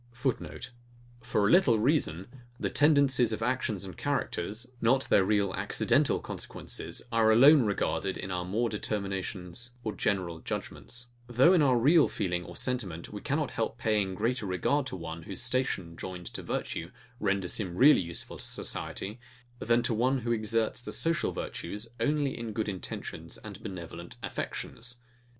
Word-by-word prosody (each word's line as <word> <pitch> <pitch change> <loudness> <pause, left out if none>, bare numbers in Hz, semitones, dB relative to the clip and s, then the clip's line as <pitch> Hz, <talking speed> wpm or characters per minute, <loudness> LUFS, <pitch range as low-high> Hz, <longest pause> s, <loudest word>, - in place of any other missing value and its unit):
[Footnote: 120 - -3 0.5
For 110 -3 +1
a - - +3
little 170 -10 +6
reason, 105 - +1 0.3
the - - -1
tendencies 140 -5 +4
of 110 0 -2
actions 120 -5 -1
and 95 -3 -8
characters, 105 +10 -2 0.2
not 130 +3 +4
their 100 - +5
real 100 -1 +2
accidental - - +2
consequences, - - -5
are 115 -1 +4
alone 135 +2 +7
regarded 100 -1 -1
in 95 - -5
our 90 -1 -1
more 105 +7 0
determinations 100 +1 -3
or 110 - -2
general 90 -5 -1
judgements; 120 +8 -5 0.2
though 125 +9 +5
in 175 - +5
our 130 -4 +4
real 150 +6 +6
feeling 90 -3 -2
or - - -10
sentiment, 105 -10 -3
we 105 - -6
cannot 150 0 -1
help 115 0 -2
paying 105 -5 +1
greater 115 +2 0
regard 130 +10 +1
to 125 - -4
one 85 -2 -6
whose 95 +7 -4
station, 125 -10 -1
joined 90 0 -6
to - - -6
virtue, 85 - -3 0.3
renders 95 -3 0
him 95 -5 -3
really 135 +2 +7
useful 85 -1 -6
to - - -7
society, 105 +5 -4 0.4
then 120 +1 +2
to - - +1
one, 125 +4 +2
who 120 +1 -1
exerts 110 0 +1
the - - -6
social 165 +1 +2
virtues 105 +6 -5
only 145 +3 +1
in 115 -2 -5
good 110 0 -1
intentions 95 -3 -6
and - - -9
benevolent 85 -2 -7
affections. 120 +1 -4
110 Hz, 160 wpm, -30 LUFS, 95-125 Hz, 0.5 s, alone